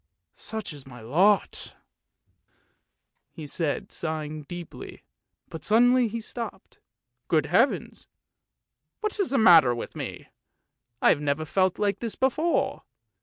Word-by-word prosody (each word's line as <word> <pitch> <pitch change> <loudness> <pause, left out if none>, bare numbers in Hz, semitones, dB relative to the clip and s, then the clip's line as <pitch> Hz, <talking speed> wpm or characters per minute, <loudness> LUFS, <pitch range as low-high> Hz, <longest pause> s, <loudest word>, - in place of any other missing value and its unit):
Such 220 -6 -6
is 140 -2 -12
my 125 -2 -11
lot! 180 - +1 0.9
" - - -49
he 155 - -7
said, 150 0 -3
sigh 155 -2 -3
ing 155 +1 -7
deeply; 175 -2 -9 0.4
but 160 -3 -9
suddenly 245 +4 +4
he 230 +2 -4
stopped. 230 +1 -8 0.2
" - - -57
Good - - +2
Heavens! - - 0 0.9
what 425 -1 -2
is 395 - +1
the 275 - +1
matter 165 - +7
with 120 - -7
me? - - -7 0.7
I - - +7
have 145 - +3
never 145 +2 -1
felt 185 +3 +1
like 205 -1 0
this 230 -3 -3
before! 305 +6 0
180 Hz, 135 wpm, -26 LUFS, 150-230 Hz, 0.9 s, matter